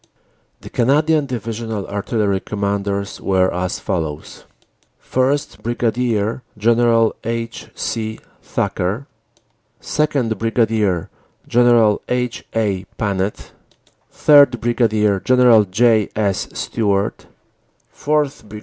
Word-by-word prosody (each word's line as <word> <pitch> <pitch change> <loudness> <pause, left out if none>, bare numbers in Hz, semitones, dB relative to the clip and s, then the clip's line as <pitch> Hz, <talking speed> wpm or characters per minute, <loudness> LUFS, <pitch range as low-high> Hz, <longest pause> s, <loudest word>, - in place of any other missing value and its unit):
The - - -11
Canadian 150 +4 +2
Divisional 115 -3 -4
Artillery 100 -1 -1
Commanders 100 0 -3
were 95 -1 +1
as 90 +1 -2
follows: 80 -7 -4 0.5
1st, 135 +3 -1
Brig. 115 -1 -1 0.2
General 115 +1 +3
H. 115 +1 -4
C. 110 -1 -3 0.2
Thacker; 100 +10 -2 0.7
2nd., 135 -8 -1
Brig. 110 -6 +1 0.4
General 120 -3 +4
H. 125 -1 -2
A. 100 -4 -1
Panet; 100 -1 -2 0.6
3rd., 140 -5 +5
Brig. 110 -4 +1
General 125 -4 +5
J. 110 +2 +2
S. 100 -3 -1
Stewart; 100 -3 -1 0.7
4th., 150 -5 -1
Brig. 105 0 -8
110 Hz, 90 wpm, -19 LUFS, 100-120 Hz, 0.7 s, 3rd